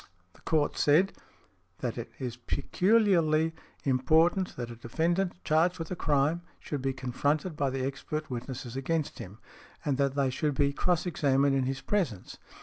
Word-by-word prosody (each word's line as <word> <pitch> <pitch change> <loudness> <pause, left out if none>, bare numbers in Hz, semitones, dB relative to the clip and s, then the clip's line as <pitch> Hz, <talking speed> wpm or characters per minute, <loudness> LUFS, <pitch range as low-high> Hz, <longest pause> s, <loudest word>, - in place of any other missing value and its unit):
The - - -21
Court 155 -3 +1
said, 170 +7 +4 0.7
that - - -2
it - - -6
is 125 -3 -4
peculiarly 165 - +2 0.3
important 160 +8 +3
that 120 -1 -5
a - - -8
defendant 170 +11 0
charged 165 +4 +2
with 165 0 -6
a - - -1
crime 150 +1 +1 0.2
should 145 -3 -4
be 135 0 0
confronted 145 +6 -1
by 140 -2 +1
the 130 0 -2
expert 150 +3 -4
witnesses 125 0 -6
against 150 +3 -2
him, 95 +3 -8 0.5
and 140 -3 +1
that 140 -1 +1
they 135 -2 +2
should 150 +2 -1
be 140 +1 +2
cross 175 +3 +1
examined 140 -4 +2
in 135 -1 +1
his 135 +1 -2
presence. 165 - -2
145 Hz, 160 wpm, -29 LUFS, 130-165 Hz, 0.7 s, said